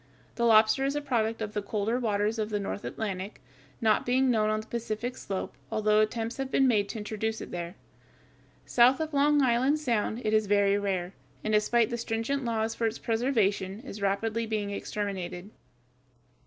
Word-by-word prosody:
The 235 - +1
lobster 220 +3 +5
is 275 +1 0
a - - +1
product 225 -5 -1
of 210 -1 -5
the 210 - -1
colder 215 +4 -1
waters 215 -1 0
of 215 0 -1
the 210 -1 -1
North 200 0 -4
Atlantic, 200 -2 -4 0.4
not 220 -2 +3
being 255 +1 +2
known 215 -2 +2
on 215 0 0
the - - -13
Pacific 235 +1 -4
slope, 195 -1 -5 0.2
although 215 0 +3
attempts 225 +2 -1
have 270 -1 -3
been 270 0 +3
made 210 -5 +2
to - - -5
introduce 220 +1 -3
it - - -8
there. 175 +1 -5 0.9
South 250 +2 +5
of 315 -1 -3
Long 290 0 +4
Island 260 +4 +3
Sound 235 -6 -1
it 215 - +1
is 215 -1 +3
very 200 0 +3
rare, 190 -2 -2 0.3
and 215 - -1
despite 225 +2 +3
the 235 - -2
stringent 230 +5 -2
laws 225 -1 -1
for 230 - 0
its 225 - -3
preservation, 215 -5 0
is 215 -6 -9
rapidly 220 +3 0
being 210 -2 -2
exterminated. 200 -2 -4
220 Hz, 180 wpm, -28 LUFS, 205-235 Hz, 0.9 s, lobster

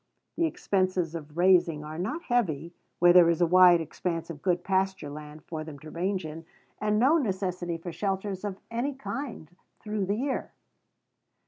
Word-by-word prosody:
The 335 - +2
expenses 185 - 0
of 155 -1 -8
raising 175 -4 +4
are 155 +2 -7
not 290 - -3
heavy 170 - 0 0.2
where 175 0 +6
there 175 -2 +7
is 170 - +1
a 175 - +5
wide 180 0 +7
expanse 165 +1 -3
of 145 -3 -10
good 175 0 +1
pasture 190 -5 0
land 150 +1 -9
for 155 -2 -5
them 155 -2 -9
to 155 +2 -11
range 185 +1 -2
in, 155 +1 -7 0.4
and 210 0 +1
no 275 +9 +5
necessity 185 - -2
for 170 +1 -7
shelters 195 +1 -3
of 200 -2 -4
any 255 +5 -2
kind 245 - -6 0.3
through 210 -3 -2
the 200 - +1
year. 265 +2 -2
180 Hz, 175 wpm, -28 LUFS, 165-205 Hz, 0.4 s, there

